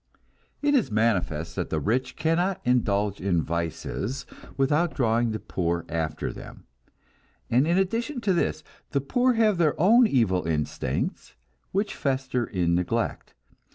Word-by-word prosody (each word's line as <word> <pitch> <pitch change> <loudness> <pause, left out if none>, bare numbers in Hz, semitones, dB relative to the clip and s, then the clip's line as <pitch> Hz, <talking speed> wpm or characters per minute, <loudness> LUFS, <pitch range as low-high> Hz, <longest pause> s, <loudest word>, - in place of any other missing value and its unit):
It 290 0 +3
is 260 -7 +3
manifest 105 -8 0
that - - -3
the 80 - 0
rich 125 - -1
cannot 175 +4 +1
indulge 105 -5 +1
in 90 -4 +1
vices, 85 - -3 0.3
without 145 +3 +2
drawing 115 -2 +2
the 110 - -2
poor 85 -4 -2
after 80 -1 -2
them; - - -11 0.9
and 130 +6 +4
in 170 +2 +2
addition 230 +8 0
to 195 -4 +2
this, 170 - 0 0.3
the 140 - +2
poor 250 - +2
have 215 -5 +2
their 155 -3 +2
own 225 +8 +6
evil 95 - +1
instincts, 75 -3 -2 0.4
which 200 +2 -1
fester 130 -3 -1
in 90 -3 0
neglect. 90 0 -1
125 Hz, 140 wpm, -26 LUFS, -, 0.9 s, own